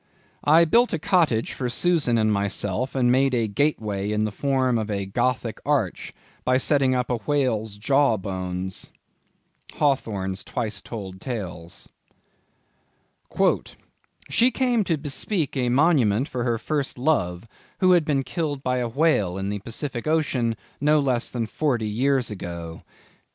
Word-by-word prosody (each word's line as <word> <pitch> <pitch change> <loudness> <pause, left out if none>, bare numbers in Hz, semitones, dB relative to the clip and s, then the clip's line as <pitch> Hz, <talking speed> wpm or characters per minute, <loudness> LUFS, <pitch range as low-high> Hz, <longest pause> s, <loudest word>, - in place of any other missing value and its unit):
"I 160 +3 +6
built 235 +9 +3
a - - +1
cottage 160 - +1
for 125 -2 -3
Susan 150 -3 +2
and 110 -1 +2
myself 100 +5 -2
and 125 -2 +3
made 135 0 +3
a 115 -2 +1
gateway 105 -5 -1
in 105 0 +1
the 110 - -2
form 130 -1 +1
of 110 -1 -3
a 100 -2 -2
Gothic 115 +3 -1
Arch, - - -1 0.3
by 130 0 +3
setting 135 -1 +2
up 125 0 -1
a 120 - +1
whale's 115 -6 -1
jaw 135 +2 +3
bones." 95 -1 -4 0.9
—Hawthorne's 105 -9 -1
Twice 110 -5 -3
Told 95 -5 -8
Tales. 95 -7 -6 2.4
"She 240 +2 +4
came 250 -4 +1
to 165 -3 +1
bespeak 150 +3 -2
a 125 -2 0
monument 130 -4 +3
for 125 -5 -3
her 120 -2 +1
first 140 +3 -2
love, 115 - 0 0.3
who 185 -1 +4
had 175 -2 +5
been 140 -3 0
killed 145 0 -3
by 125 0 0
a 120 -1 -1
whale 115 - +1
in 95 +1 -3
the 105 0 -3
Pacific 120 +5 -4
ocean, 135 -7 +1 0.2
no 150 +2 +4
less 130 -4 0
than 120 -2 -2
forty 120 -1 -1
years 130 +3 +1
ago." 85 -4 -7
125 Hz, 145 wpm, -24 LUFS, 105-145 Hz, 2.4 s, I